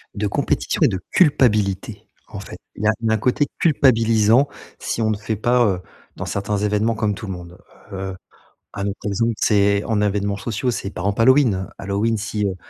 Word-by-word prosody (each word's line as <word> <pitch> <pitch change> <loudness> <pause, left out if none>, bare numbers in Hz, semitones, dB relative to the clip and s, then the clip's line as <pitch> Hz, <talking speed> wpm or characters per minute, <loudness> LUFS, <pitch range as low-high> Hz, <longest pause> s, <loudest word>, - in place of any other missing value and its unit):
De 105 0 -1
compétition - - -1
et - - +7
de 95 - -2
culpabilité, 110 - +2 0.2
en - - -8
fait. - - -9 0.2
Il 105 - -7
y - - +3
a - - +6
d'un 110 -1 +2
côté 125 +6 +1
culpabilisant 115 -4 +4 0.3
si 115 - -3
on 110 - +1
ne 105 - 0
fait 110 +1 -3
pas, 120 +3 +2
heu, 95 -3 0 0.4
dans - - -4
certains 100 +1 -2
événements 105 +2 +1
comme 110 -2 -1
tout 110 - -8
le 95 - -4
monde. 90 +1 -10 0.3
Heu, 95 -1 -5 0.6
un 100 -1 -3
autre 100 - -4
exemple, 115 +3 0
c'est 100 -1 +2
en 105 -2 0
événements 100 -1 0
sociaux, 120 +4 -2
c'est 100 - -4
par 90 -1 -6
ample 100 +2 0
Halloween. 120 -8 +4
Halloween, 100 +3 -1
si, 105 0 -2
heu, 95 -2 -1
105 Hz, 195 wpm, -21 LUFS, 100-115 Hz, 0.6 s, et